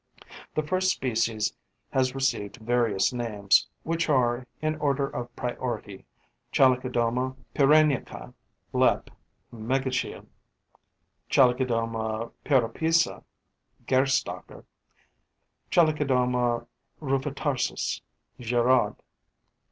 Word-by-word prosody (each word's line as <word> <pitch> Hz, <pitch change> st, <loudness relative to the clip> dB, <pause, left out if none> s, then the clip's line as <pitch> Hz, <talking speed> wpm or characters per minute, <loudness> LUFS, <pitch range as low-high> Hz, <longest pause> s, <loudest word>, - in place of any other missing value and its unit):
The 155 Hz, -, +1 dB
first 185 Hz, +4 st, +1 dB
species 115 Hz, -7 st, 0 dB, 0.4 s
has 130 Hz, 0 st, +1 dB
received 130 Hz, -6 st, -1 dB
various 115 Hz, -3 st, +1 dB
names, 105 Hz, -5 st, +2 dB, 0.2 s
which 165 Hz, 0 st, -1 dB
are, 125 Hz, -3 st, +2 dB
in 155 Hz, 0 st, -1 dB
order 140 Hz, -2 st, 0 dB
of 120 Hz, -2 st, -7 dB
priority: 120 Hz, -5 st, -4 dB, 0.5 s
Chalicodoma 125 Hz, -1 st, +2 dB, 0.2 s
pyrenaica, 150 Hz, -1 st, +2 dB, 0.4 s
LEP. -, -, +2 dB, 0.4 s
(Megachile); 130 Hz, +3 st, -2 dB, 1.0 s
Chalicodoma 115 Hz, -3 st, +1 dB
pyrrhopeza, 155 Hz, +6 st, +1 dB, 0.6 s
GERSTACKER; 130 Hz, 0 st, 0 dB, 1.0 s
Chalicodoma 125 Hz, -7 st, +2 dB, 0.3 s
rufitarsis, 135 Hz, -1 st, -1 dB, 0.4 s
GIRAUD. 120 Hz, -1 st, +2 dB
125 Hz, 70 wpm, -27 LUFS, 120-135 Hz, 1.0 s, names